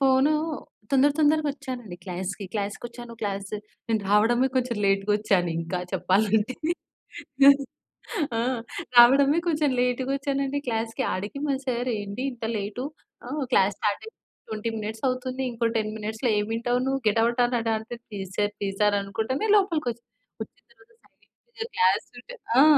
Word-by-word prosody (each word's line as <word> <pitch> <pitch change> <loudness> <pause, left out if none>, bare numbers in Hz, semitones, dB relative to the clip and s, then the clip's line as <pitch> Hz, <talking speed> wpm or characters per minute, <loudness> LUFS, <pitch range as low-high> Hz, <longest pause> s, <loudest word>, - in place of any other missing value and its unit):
Phone 270 +2 +4 0.6
తొందర 275 +1 +5
తొందరగా 305 0 +3
ఒచ్చానండి 250 - -7
క్లాస్‌కి. 190 +2 -4
క్లాస్‌కొచ్చాను 235 +3 -5
క్లాస్ 200 -1 -3 0.4
నేను 225 -1 +1
రావడమే 235 +5 +4
కొంచెం 250 -2 0
లేట్‌గోచ్చానింకా 195 -4 +1
చెప్పాలంటే. 205 +5 +2 1.8
ఆ! - - +2 0.6
రావడమే 275 +5 +7
కొంచెం 300 -3 +2
లేట్ 250 +1 +1
గోచ్చానండి 275 0 -1
క్లాస్‌కి. 225 -1 -1
అడికి 205 +8 -4
మా 280 - +1
సార్ 250 0 -1
"ఏంటి 205 +4 -5
ఇంత 230 -2 -8
లేటు? 205 +5 -4 0.4
ఆ! - - -7 0.2
క్లాస్ 195 -2 +4
స్టార్ట్ 205 -1 0
అయ్యింది 445 - -13 0.3
20 220 +1 -2
మినిట్సవుతుంది. 255 +4 -2
ఇంకో 230 0 0
10 215 -1 0
మినిట్స్‌లో 220 +3 -2
ఏం 210 0 -1
ఇంటవు 245 +1 0
నువ్వు? 270 0 0
Get 215 +2 +2
out" 240 +1 +2
అనడంటే 230 -1 -1
"please 195 -3 -6
sir 205 0 +2
please 195 -1 -3
sir" 205 -1 +4
అనుకుంటనే 225 - -2
లోపలికి 335 -10 +1
ఒచ్చాను. 235 +1 -24 0.4
ఒచ్చిన - - -30 0.2
తర్వాత - - -23 0.2
సైలెంట్‌గా 470 -2 -11
క్లాస్ 460 0 +3
వింటే 245 - -10 0.2
ఆ! - - +9
235 Hz, 135 wpm, -26 LUFS, 205-265 Hz, 1.8 s, ఆ